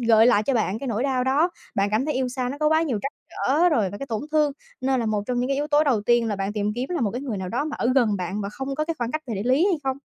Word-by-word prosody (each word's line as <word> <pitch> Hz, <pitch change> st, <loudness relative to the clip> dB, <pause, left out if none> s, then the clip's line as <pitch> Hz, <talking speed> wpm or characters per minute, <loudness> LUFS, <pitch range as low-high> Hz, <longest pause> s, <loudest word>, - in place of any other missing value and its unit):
gợi 225 Hz, -1 st, +5 dB
lại 225 Hz, -4 st, +4 dB
cho 270 Hz, +3 st, 0 dB
bạn 215 Hz, -2 st, 0 dB
cái 275 Hz, -, -6 dB
nỗi 230 Hz, +1 st, -1 dB
đau 255 Hz, -2 st, +1 dB
đó, 290 Hz, +7 st, +2 dB, 0.2 s
bạn 200 Hz, 0 st, +2 dB
cảm 220 Hz, +5 st, +1 dB
thấy 300 Hz, -, -1 dB
yêu 260 Hz, -1 st, 0 dB
xa 250 Hz, -1 st, -2 dB
nó 280 Hz, +3 st, -5 dB
có 305 Hz, 0 st, +3 dB
quá 315 Hz, +1 st, +3 dB
nhiều 260 Hz, -10 st, -1 dB
trắc 275 Hz, -, -3 dB, 0.2 s
trở 320 Hz, +7 st, +2 dB
rồi 215 Hz, -10 st, +1 dB
và 205 Hz, -, -7 dB
cái 275 Hz, -, -5 dB
tổn 225 Hz, +1 st, -3 dB
thương, 300 Hz, -2 st, +3 dB, 0.3 s
nên 260 Hz, -1 st, +1 dB
là 230 Hz, -, -1 dB
một 210 Hz, -1 st, 0 dB
trong 245 Hz, -1 st, 0 dB
những 250 Hz, -, -1 dB
cái 275 Hz, -, +1 dB
yếu 295 Hz, +1 st, -1 dB
tố 300 Hz, 0 st, +4 dB
đầu 250 Hz, -7 st, +2 dB
tiên 240 Hz, 0 st, +3 dB
là 205 Hz, -, -1 dB
bạn 195 Hz, +1 st, -2 dB
tìm 210 Hz, 0 st, -1 dB
kiếm 250 Hz, +2 st, -3 dB
là 345 Hz, -, -1 dB
một 215 Hz, -5 st, +1 dB
cái 245 Hz, -, -4 dB
người 240 Hz, -7 st, -3 dB
nào 185 Hz, -1 st, -4 dB
đó 250 Hz, +8 st, -1 dB
mà 310 Hz, -, -4 dB
ở -, -, 0 dB
gần 220 Hz, -6 st, +3 dB
bạn 185 Hz, +3 st, -3 dB
và 200 Hz, -, -3 dB
không 270 Hz, +5 st, -5 dB
có 305 Hz, -, 0 dB
cái 330 Hz, -, -2 dB
khoảng 240 Hz, 0 st, -2 dB
cách 310 Hz, 0 st, -2 dB
về 230 Hz, -, -3 dB
địa 200 Hz, -, -3 dB
lý 285 Hz, +7 st, +4 dB
hay 375 Hz, -, +2 dB
không? 265 Hz, 0 st, 0 dB
250 Hz, 350 wpm, -24 LUFS, 215-280 Hz, 0.3 s, gợi